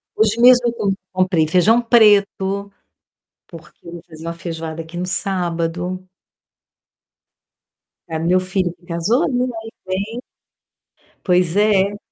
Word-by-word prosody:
Hoje 220 Hz, +1 st, +1 dB
mesmo 245 Hz, -1 st, +6 dB
eu 235 Hz, -, -1 dB
com 200 Hz, -4 st, -1 dB, 0.2 s
comprei 185 Hz, -4 st, +1 dB
feijão 200 Hz, +9 st, +3 dB
preto, 200 Hz, -3 st, +3 dB, 0.8 s
porque 165 Hz, 0 st, -15 dB
eu 170 Hz, -, -9 dB
vou 170 Hz, -, -9 dB
fazer 160 Hz, -1 st, -13 dB
uma 170 Hz, -, -4 dB
feijoada 165 Hz, -2 st, -6 dB
aqui 165 Hz, +2 st, -10 dB
no 180 Hz, -, -2 dB
sábado. 180 Hz, 0 st, -3 dB, 2.0 s
Pra 160 Hz, -1 st, -4 dB
meu 175 Hz, +3 st, +2 dB
filho 185 Hz, -1 st, -2 dB
que 175 Hz, 0 st, -26 dB
casou, 190 Hz, -, 0 dB
né, 250 Hz, -1 st, 0 dB, 0.2 s
aí 225 Hz, 0 st, -10 dB
vem 200 Hz, +6 st, -4 dB, 1.0 s
Pois 180 Hz, -1 st, +1 dB
é. 205 Hz, -1 st, +2 dB
185 Hz, 130 wpm, -19 LUFS, 170-210 Hz, 2.0 s, mesmo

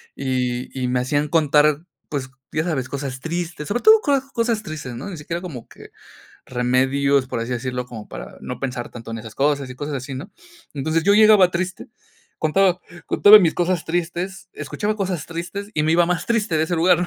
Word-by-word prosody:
y 125 Hz, -2 st, -2 dB
y 125 Hz, -, 0 dB
me 125 Hz, 0 st, +1 dB
hacían 145 Hz, +3 st, 0 dB
contar 150 Hz, 0 st, +3 dB, 0.2 s
pues 135 Hz, -3 st, -3 dB, 0.2 s
ya 155 Hz, -, 0 dB
sabes 135 Hz, -7 st, -1 dB
cosas 135 Hz, -2 st, -4 dB
tristes 165 Hz, -1 st, -4 dB
sobre 240 Hz, +4 st, 0 dB
todo 435 Hz, 0 st, +8 dB
coa 280 Hz, -6 st, +1 dB
cosas 230 Hz, -2 st, 0 dB
tristes, 155 Hz, -, -6 dB
¿no? 130 Hz, +11 st, -6 dB
Ni 190 Hz, -, -6 dB
siquiera 165 Hz, +3 st, -5 dB
como 150 Hz, -10 st, -8 dB
que -, -, -14 dB, 0.6 s
remedios 130 Hz, +2 st, +2 dB
por 115 Hz, -, -3 dB
así 115 Hz, +2 st, -4 dB
decirlo 125 Hz, 0 st, -3 dB
como 110 Hz, -4 st, -9 dB
para -, -, -9 dB
no 125 Hz, -, -6 dB
pensar 125 Hz, -3 st, -4 dB
tanto 115 Hz, -1 st, -9 dB
en 115 Hz, -, -4 dB
esas 110 Hz, -1 st, -10 dB
cosas 140 Hz, -1 st, +1 dB
y -, -, -7 dB
cosas 145 Hz, +1 st, -4 dB
así, 135 Hz, +1 st, -6 dB
¿no? 150 Hz, +11 st, -8 dB, 0.4 s
Entonces 160 Hz, +3 st, 0 dB
yo 200 Hz, -, +5 dB
llegaba 210 Hz, -4 st, +7 dB
triste 185 Hz, +1 st, -3 dB, 0.5 s
contaba 180 Hz, +3 st, +2 dB, 0.3 s
contaba 210 Hz, +1 st, +8 dB
mis 170 Hz, -6 st, +2 dB
cosas 175 Hz, -1 st, 0 dB
tristes 175 Hz, +3 st, -3 dB
escuchaba 210 Hz, +1 st, -3 dB
cosas 185 Hz, -6 st, -2 dB
tristes 175 Hz, +5 st, -6 dB
y 150 Hz, -, +1 dB
me 160 Hz, -, +3 dB
iba 175 Hz, +1 st, +5 dB
más 180 Hz, -1 st, -1 dB
triste 220 Hz, -7 st, +1 dB
de 155 Hz, -, +3 dB
ese 175 Hz, +2 st, -2 dB
lugar, 175 Hz, +1 st, +4 dB
¿no? 175 Hz, -, -1 dB
155 Hz, 200 wpm, -22 LUFS, 130-180 Hz, 0.6 s, todo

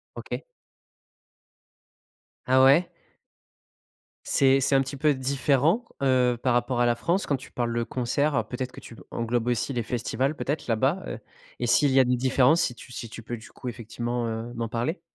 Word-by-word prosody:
OK. -, -, -6 dB, 2.0 s
Ah 130 Hz, 0 st, +4 dB
ouais? 145 Hz, +7 st, +5 dB, 1.4 s
C'est 135 Hz, 0 st, +3 dB
c'est 135 Hz, +1 st, +1 dB
un 135 Hz, -, +5 dB
petit 140 Hz, +1 st, -4 dB
peu 150 Hz, +2 st, +2 dB
différent, 140 Hz, -, +1 dB, 0.2 s
heu, 125 Hz, -2 st, +3 dB
par 125 Hz, -2 st, +2 dB
rapport 120 Hz, 0 st, 0 dB
à 120 Hz, -, +4 dB
la 120 Hz, 0 st, +3 dB
France 175 Hz, +10 st, 0 dB
quand 140 Hz, -, +1 dB
tu 130 Hz, -, -10 dB
parles 120 Hz, -2 st, -2 dB
de 120 Hz, -, +1 dB
concerts? 125 Hz, 0 st, 0 dB
Peut-être 125 Hz, +2 st, -4 dB
que -, -, -11 dB
tu 115 Hz, -, -12 dB, 0.2 s
englobes 115 Hz, 0 st, -1 dB
aussi 125 Hz, +3 st, 0 dB
les 120 Hz, -, -1 dB
festivals, 125 Hz, +5 st, -1 dB
peut-être, 145 Hz, 0 st, -3 dB
là-bas, 135 Hz, +11 st, +1 dB
heu? -, -, -5 dB, 0.4 s
Et -, -, -1 dB
s'il 145 Hz, -3 st, +4 dB
y 135 Hz, -, +5 dB
a 130 Hz, -, +6 dB
des 125 Hz, +1 st, +2 dB
différences 130 Hz, +5 st, +3 dB
si 125 Hz, -, 0 dB
tu 125 Hz, +1 st, -13 dB
si 115 Hz, -, -6 dB
tu 115 Hz, -, -9 dB
peux, 120 Hz, +2 st, -5 dB
du 110 Hz, -, -12 dB
coup, 125 Hz, -, -9 dB
effectivement, 120 Hz, +1 st, -3 dB
heu, 115 Hz, +1 st, -4 dB
m'en 115 Hz, -1 st, -3 dB
parler? 120 Hz, -, -2 dB
125 Hz, 185 wpm, -26 LUFS, 120-135 Hz, 2.0 s, a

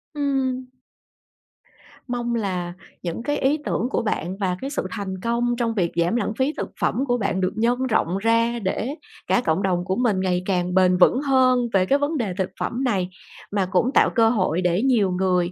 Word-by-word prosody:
Ừm. 265 Hz, -3 st, -1 dB, 1.4 s
Mong 240 Hz, -1 st, -2 dB
là 180 Hz, -5 st, -2 dB, 0.3 s
những 175 Hz, +6 st, -4 dB
cái 290 Hz, +2 st, -1 dB
ý 280 Hz, +3 st, +2 dB
tưởng 240 Hz, -, -1 dB
của -, -, 0 dB
bạn 190 Hz, -4 st, -2 dB
và 185 Hz, -3 st, -1 dB
cái 270 Hz, -, -3 dB
sự 285 Hz, -10 st, -3 dB
thành 190 Hz, -3 st, -5 dB
công 240 Hz, +1 st, 0 dB
trong 230 Hz, -2 st, 0 dB
việc 175 Hz, -5 st, 0 dB
giảm 170 Hz, +5 st, +1 dB
lãng 240 Hz, -2 st, -1 dB
phí 270 Hz, +4 st, +1 dB
thực -, -, -3 dB
phẩm -, -, +1 dB
của 245 Hz, 0 st, +2 dB
bạn 195 Hz, -3 st, -1 dB
được 185 Hz, 0 st, 0 dB
nhân 240 Hz, +3 st, +1 dB
rộng 195 Hz, -5 st, +1 dB
ra, 230 Hz, +2 st, +1 dB
để 225 Hz, +8 st, -2 dB, 0.3 s
cả 245 Hz, -, +3 dB
cộng 160 Hz, +5 st, +1 dB
đồng 180 Hz, -2 st, 0 dB
của 190 Hz, 0 st, -1 dB
mình 225 Hz, -6 st, +1 dB
ngày 180 Hz, -1 st, 0 dB
càng 180 Hz, -2 st, 0 dB
bền 185 Hz, -1 st, +4 dB
vững 250 Hz, +9 st, +4 dB
hơn 260 Hz, -3 st, +3 dB
về 185 Hz, -1 st, +4 dB
cái 280 Hz, +8 st, +2 dB
vấn 295 Hz, +2 st, -1 dB
đề 210 Hz, -7 st, -2 dB
thực 190 Hz, -, -1 dB
phẩm 250 Hz, +3 st, -2 dB
này. 190 Hz, -7 st, 0 dB, 0.4 s
Mà 200 Hz, -2 st, +1 dB
cũng 230 Hz, +7 st, +2 dB
tạo -, -, +5 dB
cơ 225 Hz, -2 st, +5 dB
hội 185 Hz, -6 st, +1 dB
để 180 Hz, +3 st, +1 dB
nhiều 220 Hz, -8 st, +3 dB
người 180 Hz, -1 st, +1 dB
215 Hz, 205 wpm, -23 LUFS, 185-245 Hz, 1.4 s, tạo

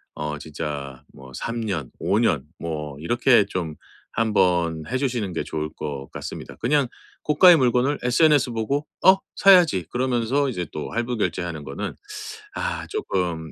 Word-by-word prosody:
어 75 Hz, 0 st, -3 dB
진짜 70 Hz, -3 st, -6 dB
뭐 65 Hz, 0 st, -13 dB
3 115 Hz, -, -3 dB
년, 90 Hz, -, -3 dB
5 100 Hz, -, +1 dB
년 100 Hz, -, +2 dB
뭐 75 Hz, -4 st, -5 dB
이렇게 120 Hz, -, +4 dB
좀 85 Hz, -6 st, -4 dB, 0.4 s
한번 90 Hz, -7 st, +1 dB
해 130 Hz, -, -1 dB
주시는 120 Hz, -8 st, -1 dB
게 80 Hz, -, -2 dB
좋을 75 Hz, 0 st, -3 dB
것 70 Hz, -3 st, -5 dB
같습니다. -, -, -7 dB
그냥 140 Hz, +3 st, +1 dB, 0.4 s
고가의 170 Hz, +4 st, +7 dB
물건을 130 Hz, +2 st, +2 dB
SNS 145 Hz, +2 st, +4 dB
보고 135 Hz, +6 st, -1 dB, 0.2 s
'어 190 Hz, 0 st, +8 dB, 0.2 s
사야지.' 180 Hz, -, +6 dB
그러면서 130 Hz, +2 st, +1 dB
이제 90 Hz, -8 st, -3 dB
또 75 Hz, -, -5 dB
할부 120 Hz, +1 st, -2 dB
결제하는 85 Hz, -5 st, -2 dB
거는 70 Hz, -, -5 dB, 0.6 s
아 -, -, -3 dB
쪼끔 90 Hz, -, -2 dB
105 Hz, 265 characters per minute, -23 LUFS, 80-130 Hz, 0.6 s, 어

